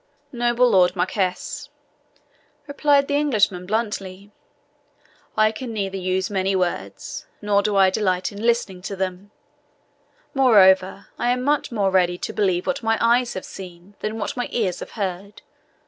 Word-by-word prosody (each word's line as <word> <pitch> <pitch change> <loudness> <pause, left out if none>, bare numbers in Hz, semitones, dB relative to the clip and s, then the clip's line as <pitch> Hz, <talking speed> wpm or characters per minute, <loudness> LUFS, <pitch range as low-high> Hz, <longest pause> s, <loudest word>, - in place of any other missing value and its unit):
"Noble 240 0 +2
Lord 185 -5 +4
Marquis," 190 +10 -2 1.0
replied 285 -1 +2
the 285 - -2
Englishman 210 -11 +1
bluntly, 200 -2 -3 1.1
"I 215 0 +4
can 230 +2 -7
neither 195 -3 -3
use 185 0 -1
many 195 -2 0
words, 180 -2 -3
nor 205 -1 +2
do 205 0 -1
I 190 -1 +5
delight 185 -2 0
in 200 0 -9
listening 230 -6 0
to 195 +2 -5
them; 190 +1 -4 1.0
moreover, 195 -8 +4
I 240 - +1
am 250 0 0
much 290 0 0
more 200 -4 +1
ready 180 -2 +2
to - - -5
believe 185 -4 0
what 275 0 -1
my 225 -1 +1
eyes 240 +1 +2
have 185 - -5
seen 180 0 -11
than 215 +1 -3
what 205 - -3
my 245 - -3
ears 190 -7 -1
have - - -9
heard. 200 0 -5
200 Hz, 150 wpm, -22 LUFS, 185-235 Hz, 1.1 s, I